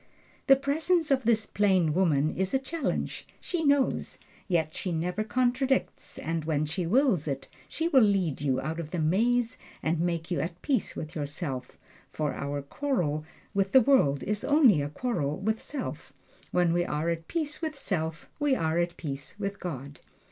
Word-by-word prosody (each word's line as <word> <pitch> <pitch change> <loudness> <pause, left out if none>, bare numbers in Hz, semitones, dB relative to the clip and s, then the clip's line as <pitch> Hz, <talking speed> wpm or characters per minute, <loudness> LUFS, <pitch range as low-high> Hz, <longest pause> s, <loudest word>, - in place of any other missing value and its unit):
The 270 - +9
presence 305 +4 +1
of 265 -3 +2
this 225 -2 +3
plain 190 -6 +2
woman 155 -4 +2
is 190 +5 0
a - - +6
challenge 270 +2 -3
she 345 -3 -2
knows! 285 -2 +2 0.3
Yet 160 -4 +1
she 185 - -3
never 180 +5 -1
contradicts, 255 +4 0
and 165 0 -2
when 155 -1 0
she 165 +3 -2
wills 215 - +3
it, 135 -2 -3 0.2
she 325 - -1
will 275 -6 +5
lead 195 - +2
you 135 -3 +1
out 160 +4 -3
of 160 -3 -5
the 175 - -3
maze 230 +9 +2 0.2
and 160 +1 +1
make 170 0 -1
you 175 - +1
at 170 +1 -3
peace 265 -7 0
with 155 -1 -6
yourself; 145 -3 -4 0.3
for 150 -2 -2
our 140 0 -3
quarrel 155 - -1 0.3
with 195 -1 0
the 265 - +9
world 145 - +3
is 210 0 -2
only 275 - +5
a 140 - -2
quarrel 155 - -2
with 220 +3 -1
self. 290 -3 -6 0.4
When 175 -2 +2
we 175 0 +2
are 155 0 -1
at 165 -1 -4
peace 310 -2 -2
with 310 -3 -3
self 160 - -3
we 290 -2 +3
are 160 -5 0
at 175 0 -1
peace 140 -3 -5
with 200 -1 -4
God. 140 -4 -6
180 Hz, 175 wpm, -28 LUFS, 155-255 Hz, 0.4 s, The